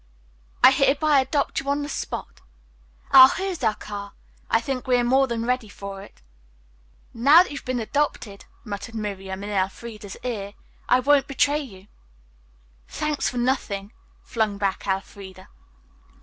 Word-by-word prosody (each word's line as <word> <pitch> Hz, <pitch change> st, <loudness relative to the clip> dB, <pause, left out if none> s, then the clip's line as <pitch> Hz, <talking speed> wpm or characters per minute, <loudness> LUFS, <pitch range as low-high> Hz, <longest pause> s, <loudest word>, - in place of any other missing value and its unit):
"I -, -, +10 dB
hereby 280 Hz, +2 st, +3 dB
adopt 280 Hz, +2 st, 0 dB
you 275 Hz, -, -5 dB
on 285 Hz, +1 st, 0 dB
the -, -, -4 dB
spot. 290 Hz, -, -6 dB, 0.7 s
Ah, 260 Hz, 0 st, +10 dB
here 385 Hz, 0 st, -2 dB
is 335 Hz, -7 st, -7 dB
our 220 Hz, -2 st, +2 dB
car. 200 Hz, -1 st, -8 dB, 0.4 s
I 225 Hz, -, +3 dB
think 255 Hz, +2 st, -4 dB
we 250 Hz, -, +3 dB
are 245 Hz, -, +1 dB
more 265 Hz, +3 st, +3 dB
than 230 Hz, -2 st, -3 dB
ready 250 Hz, -3 st, -1 dB
for 195 Hz, 0 st, -8 dB
it." 200 Hz, -, -16 dB, 0.9 s
"Now 285 Hz, +9 st, +6 dB
that -, -, -10 dB
you've 280 Hz, -, -7 dB
been 255 Hz, -1 st, -2 dB
adopted," 225 Hz, -4 st, -2 dB, 0.2 s
muttered 205 Hz, +1 st, -7 dB
Miriam 195 Hz, -2 st, -5 dB
in 205 Hz, -, -5 dB
Elfreda's 205 Hz, +1 st, -4 dB
ear, 205 Hz, -5 st, -4 dB, 0.3 s
"I 250 Hz, -, +4 dB
won't 280 Hz, +1 st, +3 dB
betray 285 Hz, +2 st, +1 dB
you." 195 Hz, -10 st, -10 dB, 1.0 s
"Thank 300 Hz, -1 st, -2 dB
you -, -, +1 dB
for 250 Hz, -, -7 dB
nothing," 235 Hz, -5 st, -2 dB, 0.3 s
flung 215 Hz, -3 st, -1 dB
back 200 Hz, -1 st, -2 dB
Elfreda. 190 Hz, -1 st, -5 dB
235 Hz, 155 wpm, -24 LUFS, 200-275 Hz, 1.0 s, I